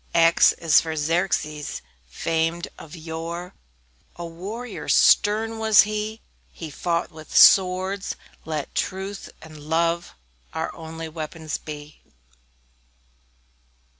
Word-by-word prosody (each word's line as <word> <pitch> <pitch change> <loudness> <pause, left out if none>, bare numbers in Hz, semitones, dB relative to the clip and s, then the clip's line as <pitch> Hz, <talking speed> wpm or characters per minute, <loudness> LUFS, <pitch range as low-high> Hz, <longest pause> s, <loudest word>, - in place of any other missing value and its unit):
X 165 0 +6
X - - -21
is 165 -3 +5
for 160 -1 -4
Xerxes, 155 -1 -1 0.3
famed 165 - -1
of 160 +1 -11
yore; 165 +2 -6 0.6
A 175 - -6
warrior 200 +8 -7
stern 220 +2 +4
was 220 -2 +7
he 215 +1 -3 0.3
He 160 -3 -8
fought 170 +3 -1
with 155 -1 -5
swords; 190 +1 +5 0.3
let 155 -2 -4
truth 195 +1 -3
and 155 -1 -12
love 165 +3 -1 0.4
Our - - -2
only 160 0 -7
weapons 160 0 -5
be. 150 0 -10
165 Hz, 105 wpm, -24 LUFS, 160-190 Hz, 0.6 s, was